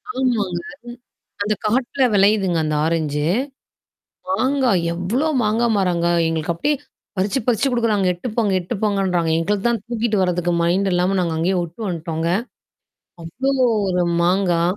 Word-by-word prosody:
ஆமாங்க. 215 -9 0 0.8
அந்த 210 +1 +1
காட்ல 250 +5 0
விளையுதுங்க 195 -3 +3
அந்த 155 0 -1
ஆரஞ்சு. 155 -3 -1 1.1
மாங்கா 270 -2 +1 0.2
எவ்ளோ 190 - -1 0.2
மாங்கா 220 +2 +1
மாரங்க 180 -3 +1 0.2
எங்களுக்கு 165 +1 -1
அப்டியே 290 - 0 0.4
பறிச்சு 195 +6 0
பறிச்சு 245 +2 +2
குடுக்குறாங்க. 225 -5 +1
எடுத்துட்டு 175 +8 -6
போங்க, 215 -4 +2
எடுத்துட்டு 180 +6 -5
போங்கன்றாங்க. 190 -5 +1
எங்களுக்கு 200 +5 -1
தான் 235 -3 -1
தூக்கிட்டு 235 -2 -1
வரதுக்கு 175 -1 0
மைண்ட் 190 +3 +1
இல்லாம 180 +2 +1
நாங்க 170 -2 -1
அங்கேயே 180 +4 +1
வுட்டு 170 +5 -7
வந்டோங்க. 165 -1 -3 0.9
அவ்ளோ 230 +12 -2 0.4
ஒரு 180 -1 +1 0.2
மாங்கா. 175 -1 +2
190 Hz, 130 wpm, -20 LUFS, 170-225 Hz, 1.1 s, விளையுதுங்க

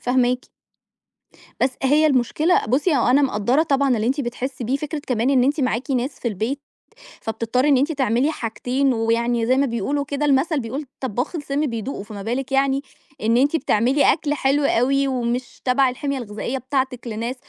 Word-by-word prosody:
فاهماكِ. 250 0 +1 1.1
بس 260 - +3
هي 295 +4 +4
المشكلة 300 +6 +2
بُصي، 290 +8 +2
أنا 260 +2 +3
مقدرّة 255 +3 +2
طبعًا 275 -4 +2
اللي 220 +1 -1
أنتِ 275 +4 0
بتحسي 250 0 -4
بيه 255 +5 0
فكرة 300 +2 -4
كمان 250 +1 +1
إن 255 -3 +4
أنتِ 290 +3 +1
معاكِ 255 +1 -1
ناس 260 +1 -1
في 240 - -2
البيت 230 +7 -3 0.6
فبتضطري 230 +5 0
إن 280 - +5
أنتِ 285 +5 +1
تعملي 265 0 +1
حاجتين، 255 +2 -1
ويعني 230 +1 +1
زي 255 +3 +2
ما 280 - +3
بيقولوا 275 +4 -2
كده 285 +1 -2
المثل 290 +2 +2
بيقول 265 +5 -5
طباخ 255 - -3
السم 290 -1 -1
بيدوقه، 230 -3 -4
فما 205 -1 -8
بالِك 250 +5 -3
يعني 275 0 +2 0.4
إن 230 +2 +2
أنتِ 285 +5 +3
بتعملي 265 0 +2
أكل 305 -2 -2
حلو 285 0 +1
أوي 275 +2 +2
ومش 245 -1 -3
تبع 260 +1 +3
الحمية 275 +2 -3
الغذائية 235 +2 -4
بتاعتِك 260 -1 -2
لناس، 230 +3 -3
260 Hz, 170 wpm, -22 LUFS, 240-280 Hz, 1.1 s, إن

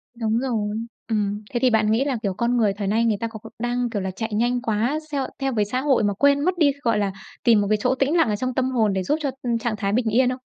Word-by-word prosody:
Đúng 225 -1 0
rồi. 220 -5 -1 0.3
Ừm, 210 -1 -1
thế 240 - -1
thì 255 - +4
bạn 215 -2 +2
nghĩ 235 +5 +2
là, 275 -4 -1
kiểu, 195 -2 0
con 235 +5 0
người 215 -4 +2
thời 200 0 -4
nay 225 +4 +2
người 220 -3 +2
ta 230 - -2
có 225 -1 -9
có 225 - -11
đang, 240 +1 -1
kiểu 210 -4 -3
là, 190 0 -3
chạy 220 +4 -5
nhanh 240 +3 +1
quá, 235 +5 0
theo- 275 -3 -1
theo 270 -1 -1
với 210 -3 +1
xã 250 +5 -2
hội, 270 -5 +2
mà 205 -1 +1
quên 280 +7 +3
mất 365 0 +1
đi, 300 -4 +4
gọi 230 -2 +2
là, 200 -1 0 0.3
tìm 225 -3 +5
một 200 - -1
cái 215 - +3
chỗ 255 +3 +2
tĩnh 275 +5 +1
lặng 325 -8 +3
ở 210 - +1
trong 255 +4 -2
tâm 260 +1 0
hồn 220 -5 +2
để 190 -1 -1
giúp 295 +12 +1
cho 280 -3 -1 0.3
trạng 230 -1 -2
thái 200 -2 -1
bình 235 0 +1
yên 250 +3 +3
không? 255 +1 -4
230 Hz, 295 wpm, -23 LUFS, 210-255 Hz, 0.3 s, tìm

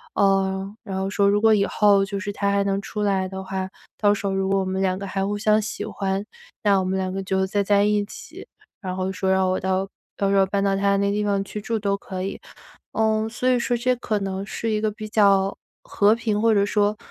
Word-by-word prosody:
呃， 195 0 +1
然 190 -4 -4
后 190 0 -1
说 200 0 +2
如 205 +1 +3
果 220 0 +5
以 200 -1 +2
后 200 -2 +3
就 200 0 -4
是 205 0 -4
他 200 0 -1
还 200 0 +2
能 195 0 0
出 210 - -5
来 195 -2 +1
的 190 0 -6
话， 190 0 -3
到 - - -16
时 - - -47 0.6
候 195 - 0
如 190 - -1
果 195 - +3
我 190 - 0
们 190 +1 -2
两 185 -1 0
个 200 - -5
还 195 0 -2
互 205 +1 -2
相 215 +1 +3
喜 205 -1 -4
欢， 195 -2 -2 0.4
那 200 -2 +4
我 - - -1
们 190 +1 -1
两 185 -1 -2
个 195 +1 -3
就 190 0 0
再 200 +1 0
在 200 0 +3
一 210 0 +2
起。 205 - -11 0.4
然 185 -2 -4
后 190 0 -2
说 190 0 -1
让 190 0 +3
我 185 - 0
到 190 +1 -1 0.3
到 200 -1 0
时 - - +3
候 195 - +5
搬 195 +1 -1
到 195 -1 +2
他 200 0 +2
那 200 0 +1
地 210 +1 0
方 200 -1 0
去 210 +2 -6
住 225 +1 -2
都 200 -1 0
可 185 -1 -6
以。 195 - -5 0.5
嗯， 220 0 +1
所 250 +2 -1
以 255 - +4
说 240 0 0
这 255 +2 +1
可 220 -3 -1
能 195 -1 -3
是 225 +2 -4
一 215 - 0
个 215 0 0
比 215 +1 -8
较 200 -2 +3 0.3
和 205 +1 +3
平 220 -2 0
或 230 0 +4
者 200 -1 +3
说， 205 0 +1
200 Hz, 275 characters per minute, -23 LUFS, 190-210 Hz, 0.6 s, 果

